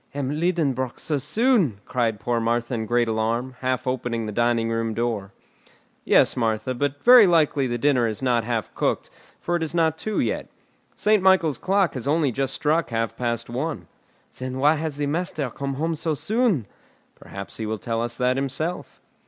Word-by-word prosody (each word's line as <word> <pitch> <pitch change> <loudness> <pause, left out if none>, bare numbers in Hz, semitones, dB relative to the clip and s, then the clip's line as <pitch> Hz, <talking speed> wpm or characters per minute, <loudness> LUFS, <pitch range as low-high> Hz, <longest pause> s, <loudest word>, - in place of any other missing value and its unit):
"M. 140 -2 -2
Liedenbrock 150 -6 -1
so 150 -3 -2
soon!" 210 - +1
cried 115 -4 -1
poor 120 +3 -1
Martha 120 +2 -1
in 110 -2 -2
great 120 0 +2
alarm, 115 +3 -1
half 130 -1 -1
opening 120 -3 -2
the 105 - -4
dining 115 +1 +1
room 115 -1 -1
door. 110 -4 -2 0.7
"Yes, - - +4
Martha; 115 +1 -1
but 145 +2 -2
very 245 -4 +9
likely 150 -5 +3
the 120 -1 -2
dinner 125 -2 +2
is 110 -2 -4
not 125 -3 +1
half 115 -1 -3
cooked, - - -1 0.3
for 175 - -1
it 170 - -1
is 160 +1 -3
not 160 -2 +2
two 215 +3 -2
yet. - - -1 0.5
Saint 210 -1 +3
Michael's 185 -7 +3
clock 195 -3 +1
has 130 0 -5
only 150 -2 +2
just 135 +2 -2
struck 155 +1 +1
half 115 -1 -2
past 115 -1 -2
one." 135 +7 -4 0.5
"Then 130 0 -4
why 145 +3 +4
has 155 -2 -3
the 145 - -1
master 150 -3 -2
come 140 +2 -4
home 160 +4 -1
so 160 0 -2
soon?" 215 - +1 0.5
"Perhaps 100 0 -9
he 110 - -4
will 110 0 -2
tell 115 +3 -2
us 120 0 -3
that 125 +1 +1
himself." 140 +6 -3
130 Hz, 185 wpm, -24 LUFS, 115-160 Hz, 0.7 s, very